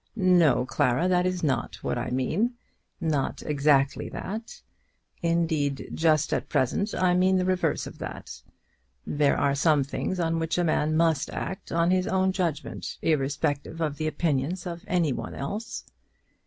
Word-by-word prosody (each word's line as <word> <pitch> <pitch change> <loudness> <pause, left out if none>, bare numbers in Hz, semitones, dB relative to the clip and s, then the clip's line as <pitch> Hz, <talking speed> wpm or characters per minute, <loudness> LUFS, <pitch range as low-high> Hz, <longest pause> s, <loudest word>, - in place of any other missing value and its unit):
"No, 180 - +4
Clara; 130 +6 +1
that 180 0 +3
is 185 -1 -2
not 140 -4 0
what - - -1
I - - -3
mean, 165 - 0 0.4
not 155 -4 -1
exactly 140 -2 +2
that. 225 - -6 0.6
Indeed, 160 -5 0
just 155 -2 +2
at - - -2
present 200 - 0
I 180 -1 +3
mean 185 +1 +3
the 180 - +1
reverse 185 -1 0
of - - -10
that. - - -7 0.6
There 145 -1 +2
are 140 - +2
some 145 0 +3
things 180 +6 -3
on 165 -1 0
which 165 +1 -1
a 175 - +2
man 155 -1 +1
must 165 -4 +2
act 190 - -5
on 170 +1 +2
his 185 0 +2
own 190 0 +2
judgment, 170 -6 -3
irrespectively 145 +1 0
of 150 -2 -4
the 155 - -1
opinions 155 +3 -1
of 170 -1 -6
any 170 -6 +1
one - - -6
else." 210 +11 -5
165 Hz, 155 wpm, -26 LUFS, 145-180 Hz, 0.6 s, No